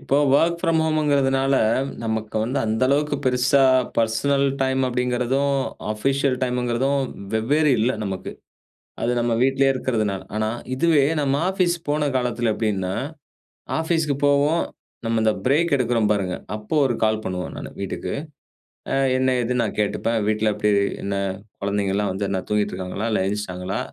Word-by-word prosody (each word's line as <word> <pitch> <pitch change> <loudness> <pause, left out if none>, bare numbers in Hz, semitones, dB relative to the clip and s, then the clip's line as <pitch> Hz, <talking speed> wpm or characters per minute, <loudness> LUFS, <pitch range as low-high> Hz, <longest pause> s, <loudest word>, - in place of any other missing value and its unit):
இப்போ 140 - 0 0.2
work 170 +3 +3
from 165 -2 +2
home 155 -2 +1
கிறதுனால, 135 -1 +2 0.5
நமக்கு 110 -1 -3
வந்து 130 +4 -1
அந்த 110 +3 -1
அளவுக்கு 145 +2 +1
பெருசா 130 +2 +3 0.3
பர்சனல் 135 +5 +2 0.2
டைம் 130 0 +1
அப்டிங்கிறதும், 125 +3 0 0.4
ஆஃபிஷியல் 135 +4 0
டைம்ங்கிறதும் 125 +2 0 0.3
வெவ்வேறு 145 +7 +2
இல்ல, 120 +4 +2
நமக்கு. 95 -2 -4 0.7
அது 120 +1 +1
நம்ம 120 0 0
வீட்டிலேயே 135 +1 +3
இருக்கிறதுனால. 110 -7 -1
ஆனா, 110 0 0 0.3
இதுவே 150 -1 +4 0.2
நம்ம 140 -1 +1 0.2
ஆஃபீஸ் 185 -3 +1
போன 150 0 +1
காலத்தில 120 -2 0
எப்டின்னா, 95 -4 -1 0.9
ஆஃபீஸுக்கு 160 -3 0
போவோம். 145 +4 +3 0.4
நம்ம 115 0 +1
இந்த 110 -1 +3
பிரேக் 155 +3 +3
எடுக்குறோம் 115 -4 +1
பாருங்க, 95 -3 -1 0.2
அப்போ 105 +8 -6
ஒரு 120 - 0
கால் 110 0 +1
பண்ணுவோம் 90 -1 -4
நானு - - -7
வீட்டுக்கு. 95 -1 -4 0.8
அ - - +2 0.2
என்ன 130 0 +2
ஏதுன்னு 125 0 0
நான் 110 - -4
கேட்டுப்பேன். 110 +2 0
"வீட்ல 110 0 +1
எப்டி? 105 - 0 0.3
என்ன? 100 0 -2 0.5
குழந்தைங்கலாம் 100 0 0
வந்து 100 +2 -2
என்ன 95 - -1
தூங்கிட்ருக்காங்களா, 105 0 -2
இல்ல 105 - +1
எழுந்துருச்சுட்டாங்களா? 95 -2 -3
125 Hz, 140 wpm, -22 LUFS, 105-140 Hz, 0.9 s, இதுவே